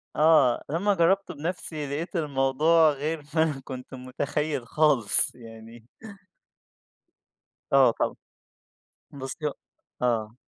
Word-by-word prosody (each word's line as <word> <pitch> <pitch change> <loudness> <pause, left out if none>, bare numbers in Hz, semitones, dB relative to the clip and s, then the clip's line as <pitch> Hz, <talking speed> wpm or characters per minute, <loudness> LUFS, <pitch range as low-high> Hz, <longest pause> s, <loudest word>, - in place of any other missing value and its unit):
آه، 155 -6 +4
لمّا 185 +7 +1
جرّبت 190 +2 +1
بنَفسي 155 -2 -5
لقيت 155 +7 -5
الموضوع 150 +2 +2
غير 150 +2 -4
ما 160 - +4
أنا 150 -4 -2
كنت 130 0 -9
متخيل 130 +1 -4
خالص 135 -10 +3
يعني. 115 -1 -13 1.9
آه 135 -3 +5
طبعًا، - - -1 1.0
بُصّي 140 +2 -5
هو 145 - -3 0.5
آه. 115 -3 -1
145 Hz, 105 wpm, -25 LUFS, 125-160 Hz, 1.9 s, آه